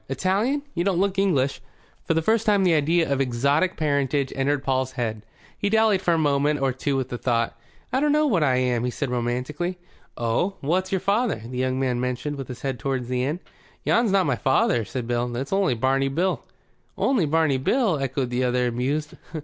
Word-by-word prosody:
Italian? 200 - 0
You 170 - -1
don't 190 -2 +1
look 195 0 +1
English." 140 -10 +1 0.4
For 165 - +1
the 165 - +1
first 225 +4 +1
time 205 -2 +4
the 180 -2 +4
idea 160 +2 +2
of 135 - 0
exotic 140 +8 +1
parentage 140 -2 0
entered 140 +1 0
Paul's 130 -1 0
head. 110 -4 -3 0.3
He 205 - -1
dallied 220 -3 +3
for 175 -3 +2
a - - +1
moment 145 -1 +2
or 135 -1 +1
two 135 +2 -1
with 130 - -2
the 120 - -5
thought. 115 -2 0 0.4
"I 260 - +3
dunno 300 +1 +3
what 200 - +2
I 135 -4 +3
am," 125 -2 +1
he 125 - 0
said 130 +1 -3
romantically. 125 +9 -2 0.4
"Oh? 120 - 0
What's 185 +6 0
your 190 -2 0
father?" 205 - 0
The 125 +1 -5
young 130 0 0
man 125 -2 0
motioned 125 +4 -3
with 135 -3 -6
his 125 - -9
head 135 -3 -2
toward 130 0 -2
the 125 0 0
inn. 150 +7 -2 0.4
"Yon's 235 -3 +2
not 195 -2 +3
my 140 -4 +1
father," 120 -3 +2
said 125 0 -5
Paul. 120 0 -1
"It's 135 +8 -3
only 195 -9 +2
Barney 135 +3 +1
Bill." 175 +7 -1 0.5
"Only 235 - +2
Barney 150 -3 +2
Bill?" 205 - +1
echoed 135 -2 -2
the 125 +1 0
other, 125 0 +1
amused. 140 +6 -2
140 Hz, 205 wpm, -24 LUFS, 125-185 Hz, 0.5 s, time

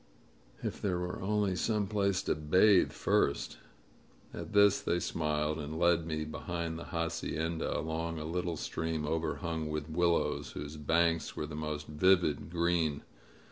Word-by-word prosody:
"If - - -4
there 95 -3 0
were 90 0 -4
only 100 -1 +1
some 105 +4 0
place 100 -2 0
to - - +1
bathe 90 +6 +4
first - - 0 0.4
!" - - -29
At - - -6
this 100 -1 +5
they 85 - 0
smiled 75 -2 -1
and 75 +1 -5
led 85 -1 +3
me 80 -1 -2
behind 85 +1 -4
the - - -7
hacienda, 85 -1 -2
along 80 +1 -3
a 75 - -5
little 85 0 -2
stream 80 0 -2
overhung 80 0 -2
with 75 +1 -4
willows, 85 +1 +1
whose 75 +1 -6
banks 80 +1 +1
were - - -3
the 75 - -8
most 75 0 -4
vivid 80 -1 +2
green. 85 -3 +1
80 Hz, 150 wpm, -32 LUFS, 75-90 Hz, 0.4 s, this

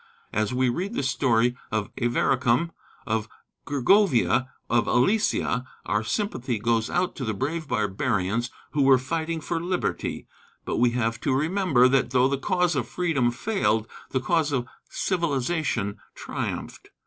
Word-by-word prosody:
As 105 0 0
we 130 +1 +2
read 185 - -2
the - - -1
story 125 -3 +2 0.2
of 110 -2 -1
Avaricum, 120 +5 +2 0.3
of 110 -1 -1 0.4
Gergovia, 145 - +3 0.2
of 120 - +2
Alesia, 125 - +2 0.2
our 105 +1 0
sympathy 130 - -2
goes 115 +1 +1
out 180 +1 0
to 135 - -4
the 110 -3 -2
brave 155 +7 -3
barbarians 105 +1 0 0.2
who 150 - +1
were 135 -1 +6
fighting 160 +5 -2
for 165 +2 -2
liberty 180 +1 -2 0.4
but - - -2
we 120 +1 +4
have 115 -1 -1
to 135 - +1
remember 155 -4 +3
that 130 -2 +2
though 130 0 +4
the 140 0 -1
cause 180 +1 +1
of 125 -4 -1
freedom 155 -7 +1
failed, 120 - 0 0.2
the 130 - 0
cause 155 +2 +1
of 125 -3 0 0.2
civilization 150 - -1 0.2
triumphed. - - -5
130 Hz, 145 wpm, -25 LUFS, 115-165 Hz, 0.4 s, were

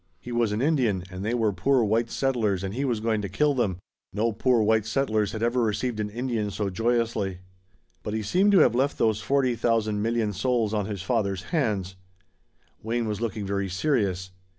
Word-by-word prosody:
He 120 - -9
was 120 -2 +1
an 105 +4 -1
Indian 125 - +1
and 90 +1 -6
they 115 +3 0
were 110 -4 +1
poor 125 +7 +2
white 115 +2 +1
settlers 110 -9 0
and 95 0 -3
he 135 +5 -1
was 120 -5 0
going 110 -1 0
to 100 - -4
kill 150 -1 +2
them. 105 -9 0 0.3
No 110 +3 0
poor 120 +2 +2
white 110 0 +2
settlers 110 -4 0
had 110 -1 -4
ever 120 +1 +1
received 110 +1 -1
an 105 -1 -2
Indian 115 -2 -2
so 100 -1 -3
joyously. 115 -3 0 0.6
But 105 - -4
he 110 - -2
seemed 190 - +3
to 190 - +7
have - - +5
left 135 +4 +1
those 110 -2 +1
forty 130 +3 +1
thousand 110 -3 0
million 115 -1 0
souls 115 0 0
on 105 -2 -1
his 100 -4 -5
father's 100 -4 -1
hands. 100 - -1 0.8
Wayne 115 +1 -1
was 105 0 -3
looking 110 -3 -3
very 100 0 -2
serious. 95 -4 0
110 Hz, 195 wpm, -26 LUFS, 105-120 Hz, 0.8 s, to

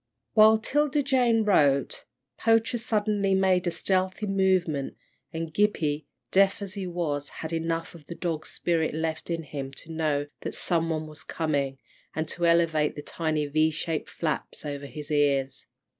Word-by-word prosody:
While 220 0 +7
'Tilda 290 +5 +1
Jane 245 -4 +3
wrote, 145 -9 +2 0.3
Poacher 225 +1 +2
suddenly 210 -3 +1
made 190 -1 +2
a - - +4
stealthy 185 +4 0
movement, 185 -8 +1 0.3
and 165 -1 -5
Gippie, 155 -7 +1 0.2
deaf 195 +1 +4
as 200 -2 -5
he 195 -2 -4
was, 150 -5 -2
had 160 +1 -6
enough 165 +1 -2
of 160 -4 -14
the 170 - -6
dog 165 -3 -3
spirit 165 -3 0
left 160 0 -3
in 165 -1 -2
him 140 -2 -6
to 165 - -11
know 155 -3 0
that - - -4
some 165 -2 +1
one 155 -1 -1
was 155 +1 -11
coming, 140 -4 -1 0.4
and 160 0 -1
to 175 -1 0
elevate 165 -3 +3
the 145 - -7
tiny 155 -2 -1
V 155 +2 +2
shaped 160 0 -3
flaps 155 -1 -3
over 145 -1 -5
his 150 +1 -8
ears. 140 -2 +1
165 Hz, 160 wpm, -27 LUFS, 150-190 Hz, 0.4 s, While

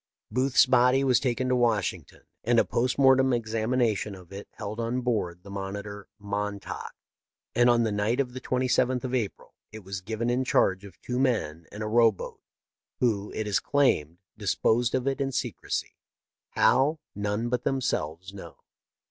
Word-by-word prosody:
" - - -65
Booth's 130 +4 +4
body 125 +1 +4
was 130 -3 +4
taken 130 -1 -1
to 125 - +2
Washington, 115 -6 -1 0.2
and 120 +1 +2
a - - +5
post 125 +2 0
mortem 130 -1 +5
examination 115 -2 0
of 90 0 -14
it 100 +1 -8
held 105 +1 -6
on 120 +2 -1
board 95 -8 -2
the 100 - -11
monitor 100 +1 -6
" - - -56
Montauk," 105 -1 -4 0.6
and 120 0 +4
on 120 -1 +4
the 110 - 0
night 105 +4 0
of 125 -3 -1
the 130 - -7
27th 130 0 +1
of 130 -1 -4
April 115 -6 -3 0.2
it 110 -1 -10
was 95 0 -6
given 110 +4 -2
in 125 +2 +1
charge 95 -6 +2
of 95 -4 -14
two 125 0 -3
men 85 - 0
in 105 +1 -6
a - - -3
row 115 +1 +5
boat, 100 - -9 0.6
who, 105 -5 0
it 110 - -2
is 105 -2 +1
claimed, 90 - +1 0.2
disposed 115 +3 +1
of 130 0 -1
it 135 +1 0
in 135 0 0
secrecy - - -3 0.3
— - - -65
how, 145 +5 +4 0.2
none 105 +3 -2
but 125 0 -1
themselves 95 - -2
know. 100 - -10
115 Hz, 180 wpm, -27 LUFS, 100-125 Hz, 0.6 s, a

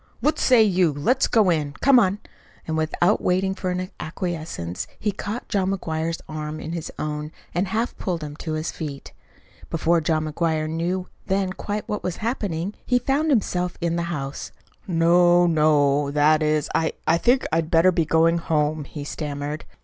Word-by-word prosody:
"What 305 - +1
say 250 -4 +5
you? 185 -5 +3
Let's 145 - +1
go 210 -6 +4
in. 150 -3 -1
Come 270 - +5
on." 195 -3 +2 0.5
And 160 - -1
without 160 +5 +1
waiting 190 +1 +1
for 185 -1 -3
acquiescence, 155 - -4
he 210 - -1
caught 210 +4 -5
John 190 -2 0
McGuire's 165 -3 -2
arm 155 0 -5
in 155 - -6
his 170 -2 -5
own 150 0 -4 0.2
and 180 +3 0
half 225 +5 -1
pulled 175 -5 -2
him 145 -1 -6
to 160 -1 -4
his 155 +1 -2
feet. 140 - -7 0.6
Before 165 +1 +2
John 155 0 0
McGuire 155 0 -1
knew 175 +3 -2 0.2
then 190 -1 0
quite 205 +2 -4
what 210 - -3
was 180 - -3
happening, 205 -6 -2
he 250 - +2
found 275 +6 0
himself 180 -8 0
in 170 -1 0
the 170 - 0
house. 140 -4 -5 0.4
"No, 175 0 +4
no! 150 -3 +3
that 150 +2 +3
is, 155 -1 +1
I 160 - +1
I 165 +1 +3
think 250 +6 +3
I'd 160 0 0
better 170 +3 +5
be 170 -2 +1
going 165 +2 +3
home," 155 -2 0
he 145 +1 -7
stammered. 145 0 -5
165 Hz, 170 wpm, -23 LUFS, 155-185 Hz, 0.6 s, say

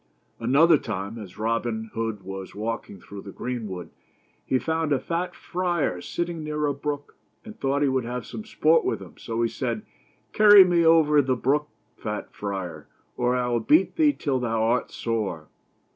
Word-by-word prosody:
Another 145 +7 +5
time, 105 0 -5
as 100 -4 -10
Robin 110 0 -2
Hood 110 -3 -3
was 95 0 -7
walking 110 -2 -4
through 100 +2 -10
the 100 - -9
greenwood, 110 -9 -5 0.5
he 130 - +1
found 160 +2 -1
a 140 - +4
tat 170 +5 -3
friar 175 - -1
sitting 170 - -3
near 150 0 -2
a 145 - +1
brook, 145 +1 -5 0.3
and 220 -1 -9
thought 140 +1 +1
he - - +3
would 130 -1 +1
have 125 +1 -4
some 220 - -7
sport 165 -6 +3
with - - -1
him, - - -13
so 115 0 -2
he - - +3
said: 130 - -3 0.3
" - - -39
Carry 205 -2 +9
me 175 -2 +3
over 160 -2 +5
the 130 -1 0
brook, 145 +5 0 0.3
fat 105 -1 -5
friar, 95 -6 -5 0.3
or 125 0 +1
I 125 -1 0
will 120 -1 +1
beat 155 +11 +3
thee 305 -2 +5
till 135 - -1
thou 115 -2 0
art 120 +3 +1
sore." 100 -9 -3
125 Hz, 180 wpm, -25 LUFS, 110-155 Hz, 0.5 s, Carry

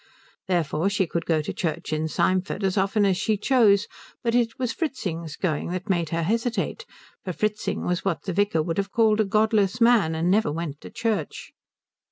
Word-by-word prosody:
Therefore 170 0 +1
she 200 -1 +1
could 170 0 -4
go 155 -2 +2
to - - -4
church 165 -1 -3
in 155 +1 0
Symford 185 +4 0
as 190 -1 +1
often 200 +1 +2
as 190 -2 +2
she 215 +2 0
chose; 210 -3 +3 0.4
but 230 -1 0
it 235 +1 +1
was 250 -3 -1
Fritzing's 170 - -4
going 160 -6 -1
that 185 +3 -3
made 170 -3 0
her 165 +1 -1
hesitate, 230 +6 -1 0.4
for 185 - -4
Fritzing 215 +3 -2
was 180 0 -1
what 195 -4 -1
the 190 - -3
vicar 200 -4 +1
would 165 +3 -2
have 195 0 -2
called 220 -2 +3
a 215 - +3
godless 215 +1 +2
man, 230 -9 +4
and 165 +3 +1
never 205 -6 +2
went 155 -2 -5
to - - -9
church. 230 - -3
195 Hz, 195 wpm, -25 LUFS, 170-215 Hz, 0.4 s, man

